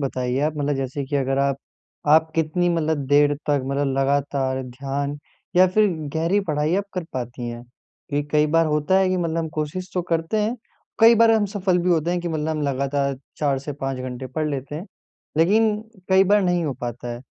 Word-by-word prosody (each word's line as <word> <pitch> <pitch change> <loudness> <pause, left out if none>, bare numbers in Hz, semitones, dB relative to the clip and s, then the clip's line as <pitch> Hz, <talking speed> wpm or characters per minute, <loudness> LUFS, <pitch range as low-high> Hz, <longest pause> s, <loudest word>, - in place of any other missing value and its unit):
बताइए 130 -2 -1
आप, 150 +1 +1
मतलब 145 0 0
जैसे 135 +1 -3
कि 145 +2 -2
अगर 135 0 0
आप 140 -1 +1 0.5
आप 160 +1 +5
कितनी 165 +2 +1
मतलब 160 -4 0
देर 145 +1 +4
तक 145 -1 +3
मतलब 140 0 0
लगातार 135 -1 0
ध्यान 140 +3 -4 0.4
या 185 - +7
फिर 210 +4 +3 0.3
गहरी 170 +6 +2
पढ़ाई 150 +2 +1
आप 200 - 0
कर 180 -2 -2
पाती 120 -1 -5
हैं? 120 0 -7 0.5
ये 145 - +1
कई 150 0 +3
बार 165 +2 +3
होता 150 +5 +2
है 190 -1 +3
कि 185 - +1
मतलब 165 -2 -1
हम 165 -1 -2
कोशिश 165 +4 -3
तो 180 - 0
करते 165 +6 0
हैं, 225 +4 -1 0.4
कई 230 +1 +8
बार 230 0 +5
हम 220 -2 +3
सफल 190 -3 0
भी 180 +1 +1
होते 165 0 +2
हैं 175 0 0
कि 175 - -3
मतलब 155 -1 -2
हम 155 -1 -1
लगातार 140 0 -1 0.2
4 140 -3 +1
से 140 +2 -6
5 135 -1 -4
घंटे 130 0 -5
पढ़ 150 +5 -2
लेते 140 +1 -4
हैं, 170 +6 -6 0.5
लेक़िन 210 +6 +4 0.3
कई 190 0 +5
बार 205 +1 +4
नहीं 175 -2 +1
हो 145 - -1
पाता 120 0 -5
है। 120 - -9
150 Hz, 210 wpm, -23 LUFS, 135-175 Hz, 0.5 s, कई